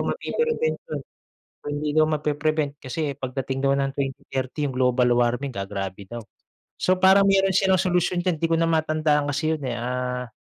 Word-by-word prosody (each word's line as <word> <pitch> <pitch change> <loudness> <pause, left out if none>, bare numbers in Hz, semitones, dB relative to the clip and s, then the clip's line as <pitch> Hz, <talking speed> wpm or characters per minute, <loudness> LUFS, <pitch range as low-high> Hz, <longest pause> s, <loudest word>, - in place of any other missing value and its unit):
mapi-prevention 475 0 -1
yun, - - -4 0.6
kung - - -6
hindi 150 0 -2
daw 155 +1 +4
mapi-prevent 150 -1 -1
kasi 145 +2 -3
pagdating 130 +1 -3
daw 140 0 +2
ng 135 0 0
2030 135 0 -3
yung 140 - -2
global 125 -1 +2
warming 120 +3 +1
gagrabe 100 -1 -5
daw. 120 +1 -7 0.5
So, 185 - +2
parang 190 +1 +6
meron 195 -1 +3
silang 190 -1 +3
solusyon 180 -1 +1
diyan 175 -2 0
hindi 165 - 0
ko - - +2
na 165 0 +2
matandaan 155 -2 +1
kasi 155 +3 0
yun, 145 - -11
eh. 125 - -2
Ah, 125 +1 -3
145 Hz, 175 wpm, -24 LUFS, 125-165 Hz, 0.6 s, parang